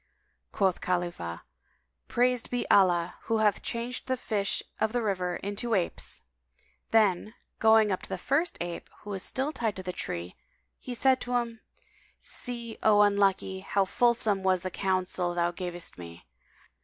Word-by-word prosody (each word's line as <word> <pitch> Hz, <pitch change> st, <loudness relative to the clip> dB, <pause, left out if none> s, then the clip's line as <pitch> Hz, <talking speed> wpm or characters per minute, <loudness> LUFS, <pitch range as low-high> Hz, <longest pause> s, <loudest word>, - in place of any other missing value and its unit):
Quoth 190 Hz, -3 st, +1 dB
Khalifah, 175 Hz, -, -2 dB, 0.6 s
"Praised 250 Hz, 0 st, +1 dB
be 245 Hz, -1 st, -2 dB
Allah 175 Hz, -3 st, +4 dB
who 225 Hz, -, +1 dB
hath 215 Hz, -2 st, +2 dB
changed 240 Hz, +2 st, -4 dB
the 260 Hz, 0 st, 0 dB
fish 205 Hz, -5 st, 0 dB, 0.2 s
of 220 Hz, +1 st, +1 dB
the 245 Hz, -, +1 dB
river 180 Hz, -4 st, -1 dB
into 205 Hz, +5 st, -2 dB
apes!" 180 Hz, -3 st, 0 dB, 0.7 s
[FN#188] -, -, -50 dB
then, 215 Hz, -1 st, +3 dB, 0.3 s
going 220 Hz, -1 st, +5 dB
up 185 Hz, -, -1 dB
to -, -, -11 dB
the -, -, -2 dB
first 305 Hz, +7 st, 0 dB
ape, 175 Hz, -1 st, -5 dB
who 205 Hz, -, -8 dB
was 195 Hz, -2 st, -3 dB
still 265 Hz, +8 st, -1 dB
tied 225 Hz, -8 st, -1 dB
to 185 Hz, -, -6 dB
the 180 Hz, 0 st, -4 dB
tree, 85 Hz, -, -4 dB, 0.4 s
he 250 Hz, -, -5 dB
said 260 Hz, +1 st, +3 dB
to 245 Hz, 0 st, -2 dB
him, 235 Hz, -2 st, -1 dB, 0.6 s
"See, 235 Hz, -2 st, -5 dB
O 210 Hz, -1 st, +6 dB
unlucky, 195 Hz, -2 st, +2 dB
how 195 Hz, +1 st, +1 dB
fulsome 225 Hz, -2 st, +2 dB
was 185 Hz, -2 st, +2 dB
the 185 Hz, -, -3 dB
counsel 185 Hz, -2 st, 0 dB
thou 175 Hz, 0 st, +1 dB
gavest 175 Hz, -, -6 dB
me! 85 Hz, -1 st, -10 dB
200 Hz, 160 wpm, -29 LUFS, 180-235 Hz, 0.7 s, O